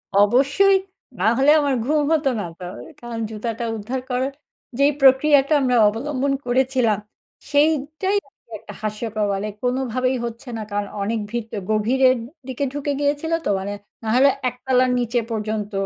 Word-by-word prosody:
অবশ্যই। 275 - +4 0.4
না 185 - 0
হলে 275 +2 +5
আমার 285 -2 +1
ঘুম 300 +3 +2
হত 315 -2 +2
না 205 - -3
তো। - - -8 0.4
কারণ 240 -1 -6
জুতাটা 225 +1 -4
উদ্ধার 240 +5 -4
করার 255 +2 -1 0.5
যেই 280 +1 +5
প্রক্রিয়াটা 275 +2 +5
আমরা 250 -2 +2
অবলম্বন 275 +5 -1
করেছিলাম, 250 -3 +2 0.5
সেইটাই 310 +6 +1
আসলে 265 - -32
একটা - - -11
হাস্যকর, 215 0 -2
মানে 195 +2 -2 0.2
কোনোভাবেই 255 0 0
হচ্ছে 235 +2 -7
না। - - -4
কারণ 205 0 -2
অনেক 220 +3 -1
ভিত 235 -1 -4 0.2
গভীরের 255 +5 +3 0.3
দিকে 260 +1 -3
ঢুকে 290 0 -2
গিয়েছিল 290 +3 -1
তো। - - 0
মানে 200 +2 -4 0.3
নাহলে 250 +5 +4 0.2
১ 250 - -14
তলার 255 -1 +3
নিচে 240 0 0
পর্যন্ত 215 -1 -3
255 Hz, 150 wpm, -22 LUFS, 220-280 Hz, 0.5 s, হলে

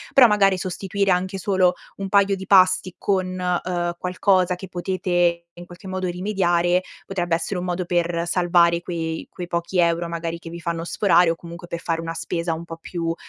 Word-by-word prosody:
Però 265 - +9
magari 200 -3 +3
sostituire 195 +2 -1
anche 185 +2 0
solo 185 -1 +2 0.2
un 195 -1 -4
paio 200 0 +4
di 190 - -8
pasti 185 -1 +4
con, 185 -2 -1 0.3
uhm, 175 -1 -1
qualcosa 185 0 +2
che 190 +1 -9
potete 175 -1 0 0.2
in 175 - -9
qualche 175 +2 -12
modo 185 0 -2
rimediare, 180 -1 +1 0.2
potrebbe 175 -3 -2
essere 180 +2 -3
un 180 - -4
modo 180 0 -2
per 170 -1 0
salvare 170 -1 +3
quei 165 -2 -4
quei 175 -2 -7
pochi 170 +1 -2
euro 170 0 +2
magari 170 0 -4
che 165 -1 -10
vi 170 - -8
fanno 170 -1 -3
sforare 175 -1 +3
o - - -2
comunque 170 +1 -10
per 170 -1 -5
fare 165 -1 -2
una 165 0 -4
spesa 165 +1 -2
un 165 +1 -6
po' 165 - -7
più, 170 +1 -6
uhm, 165 - 0
175 Hz, 195 wpm, -22 LUFS, 170-185 Hz, 0.3 s, Però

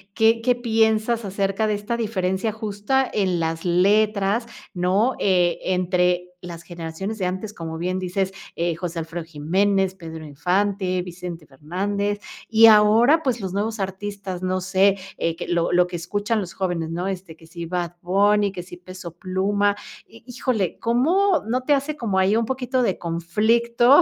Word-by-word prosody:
qué 225 +1 +4
qué 245 +1 +3
piensas 225 -1 +1
acerca 195 +2 -1
de 210 - +1
esta 210 +3 -3
diferencia 200 -2 -1
justa 220 +5 -1
en 185 -4 +1
las 165 0 -2
letras, 200 +4 +2 0.3
¿no?, 195 +7 +2
eh, 180 -3 +2
entre 180 -1 +1
las 170 -2 -8
generaciones 170 +5 -6
de 190 - -1
antes, 190 +4 -3
como 160 -1 -6
bien 180 +2 -1
dices, 185 +1 -1 0.2
eh, 170 0 0
José 170 0 -4
Alfredo 165 +1 -5
Jiménez, 190 +5 +1
Pedro 160 -3 -8
Infante, 185 +4 0
Vicente 175 -3 -8
Fernández, 200 +8 -2 0.3
y 225 0 +7
ahora, 225 +8 +6
pues 245 -4 0
los 190 -2 -4
nuevos 215 +3 -2
artistas, 195 -1 -5
no 185 0 0
sé, 190 +1 +3 0.2
eh, 165 -1 -1
que 175 - -6
lo 170 -1 +1
lo 180 0 +4
que 180 - -7
escuchan 205 +6 -1
los 180 -2 -7
jóvenes, 175 -4 -2
¿no?, 175 +3 -2
este, 185 -4 -5
que 160 0 -18
si 170 +1 -7
Bad 175 0 -3
Bunny, 200 +3 +3
que 185 -2 -6
si 175 0 -11
Peso 180 -2 -10
Pluma, 200 +3 +1 0.3
hi 230 - -17
híjole, 235 -6 -1
¿cómo 320 +10 +2
no 250 +3 0
te 290 +3 +2
hace 285 +2 -1
como 210 -8 0
ahí 190 +3 +3
un 230 0 +2
poquito 255 0 -1
de 195 -6 0
conflicto 230 - +3
195 Hz, 165 wpm, -23 LUFS, 175-220 Hz, 0.3 s, y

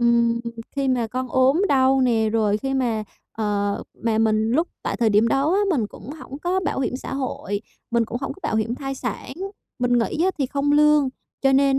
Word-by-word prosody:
Ừm, 235 0 +3 0.4
khi 275 -1 +1
mà 245 -3 +1
con 255 +3 -3
ốm 265 +8 +4
đau 265 -1 +4
nè, 230 -4 +3
rồi 215 -2 +2
khi 270 +3 -2
mà, 235 -5 0 0.3
ờ, 205 -2 -1 0.2
mà 225 -2 +2
mình 220 0 +2
lúc 320 +8 +2
tại - - -2
thời 230 -2 +2
điểm 210 +3 +4
đó 280 +8 +2
á 400 - +3
mình 255 - +1
cũng 235 - -11
hổng 285 -2 -9
có 360 +4 0
bảo 340 - -1
hiểm 255 -1 -1
xã 265 - -6
hội, 245 -6 -3 0.3
mình 235 -1 +2
cũng 235 +2 -4
hổng 270 - -3
có 385 - -18
bảo 220 - 0
hiểm 220 +2 0
thai 270 +1 -4
sản, 265 - -5 0.5
mình 245 0 +1
nghỉ 300 +8 0
á 380 - +3
thì 275 - +1
không 280 +2 0
lương, 300 -1 +5 0.3
cho 270 -1 +4
nên 270 0 +4
255 Hz, 220 wpm, -23 LUFS, 225-275 Hz, 0.5 s, lương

